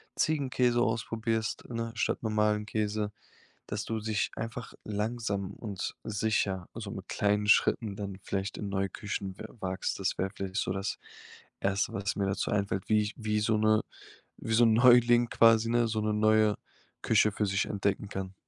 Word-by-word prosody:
Ziegenkäse 130 Hz, -5 st, +1 dB
ausprobierst, 110 Hz, -1 st, -1 dB
ne, 115 Hz, -1 st, -3 dB
statt 110 Hz, -, 0 dB
normalen 105 Hz, -1 st, +1 dB
Käse. 105 Hz, 0 st, -1 dB, 0.6 s
Dass 105 Hz, 0 st, -3 dB
du 110 Hz, -1 st, -3 dB
sich 105 Hz, -1 st, -1 dB
einfach 115 Hz, +1 st, -6 dB
langsam 105 Hz, -2 st, -2 dB
und 100 Hz, -3 st, -5 dB
sicher 100 Hz, -4 st, -1 dB
also -, -, -6 dB
mit -, -, -8 dB
kleinen 105 Hz, 0 st, +1 dB
Schritten 105 Hz, 0 st, +3 dB
dann 100 Hz, -2 st, -5 dB
vielleicht 95 Hz, +1 st, -3 dB
in 105 Hz, -, -4 dB
neue 95 Hz, 0 st, -1 dB
Küchen 100 Hz, -2 st, -5 dB
we -, -, -6 dB
wagst. 95 Hz, 0 st, -2 dB
Das 95 Hz, -, -1 dB
wäre 95 Hz, -, 0 dB
vielleicht 95 Hz, -1 st, -5 dB
so 95 Hz, -, 0 dB
das 95 Hz, +1 st, -3 dB, 0.6 s
1. 95 Hz, 0 st, 0 dB
was 100 Hz, +1 st, -2 dB
mir 100 Hz, -, 0 dB
dazu 95 Hz, 0 st, -1 dB
einfällt, 100 Hz, -2 st, -1 dB
wie 110 Hz, -1 st, +4 dB
ich 105 Hz, 0 st, -4 dB
wie 105 Hz, -2 st, -1 dB
so 110 Hz, +1 st, +2 dB
'ne 110 Hz, 0 st, +3 dB, 0.6 s
wie 115 Hz, -, -4 dB
so 120 Hz, +2 st, +6 dB
'n 115 Hz, -1 st, +5 dB
Neuling 120 Hz, 0 st, +6 dB
quasi, 115 Hz, 0 st, +5 dB
ne, 120 Hz, 0 st, +3 dB
so 110 Hz, -1 st, -1 dB
'ne 105 Hz, 0 st, 0 dB
neue 110 Hz, 0 st, +3 dB, 0.5 s
Küche 110 Hz, -1 st, +4 dB
für 105 Hz, 0 st, 0 dB
sich 95 Hz, 0 st, 0 dB
entdecken 100 Hz, 0 st, -1 dB
kann. 95 Hz, -1 st, -5 dB
105 Hz, 170 wpm, -30 LUFS, 100-115 Hz, 0.6 s, so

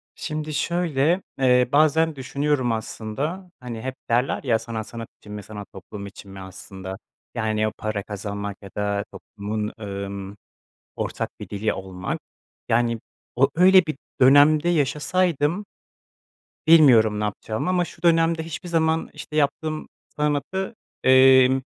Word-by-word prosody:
Şimdi 155 Hz, 0 st, -4 dB
şöyle, 170 Hz, +1 st, +1 dB, 0.2 s
eee, 125 Hz, -2 st, +4 dB
bazen 155 Hz, +2 st, +3 dB
düşünüyorum 140 Hz, -1 st, 0 dB
aslında, 135 Hz, -, -4 dB
hani, 120 Hz, -3 st, -7 dB
hep 130 Hz, +1 st, -4 dB
derler, 120 Hz, +3 st, +1 dB
ya: 115 Hz, -5 st, +2 dB
sanat 115 Hz, -2 st, -5 dB
sanat 115 Hz, -1 st, -7 dB
için 105 Hz, -, -10 dB
mi, 105 Hz, -1 st, -6 dB
sanat 105 Hz, 0 st, -9 dB
toplum 100 Hz, +2 st, -9 dB
için 100 Hz, 0 st, -12 dB
mi 95 Hz, -, -9 dB
aslında. 95 Hz, 0 st, -8 dB, 0.4 s
Yani, 110 Hz, -1 st, 0 dB
o 110 Hz, -, -2 dB
para 110 Hz, -2 st, -3 dB
kazanmak 100 Hz, 0 st, -5 dB
ya 100 Hz, -, -10 dB
da 100 Hz, 0 st, 0 dB
toplumun, 105 Hz, +1 st, -5 dB
ımm, 100 Hz, -1 st, -6 dB, 0.6 s
ortak -, -, -3 dB
bir -, -, -8 dB
dili 105 Hz, +2 st, -1 dB
olmak, 95 Hz, -1 st, -5 dB, 0.5 s
yani, 115 Hz, 0 st, +2 dB, 0.4 s
o 135 Hz, +2 st, +4 dB
öyle 185 Hz, +1 st, +7 dB
bir 155 Hz, -, -3 dB, 0.3 s
dönemde 145 Hz, +5 st, +6 dB
yaşasaydım 165 Hz, +3 st, +1 dB, 1.0 s
bilmiyorum 120 Hz, -10 st, +6 dB
ne 105 Hz, -, -1 dB
yapacağımı 110 Hz, -, -3 dB
ama 180 Hz, -1 st, +2 dB
şu 165 Hz, -, -13 dB
dönemde 165 Hz, -1 st, +3 dB
hiçbir 165 Hz, +2 st, -7 dB
zaman, 160 Hz, -1 st, +1 dB
işte, 155 Hz, -, -9 dB
yaptığım 155 Hz, +1 st, 0 dB, 0.3 s
sanatı, 150 Hz, +8 st, -1 dB, 0.3 s
emm, 130 Hz, 0 st, +6 dB
130 Hz, 135 wpm, -23 LUFS, 105-155 Hz, 1.0 s, öyle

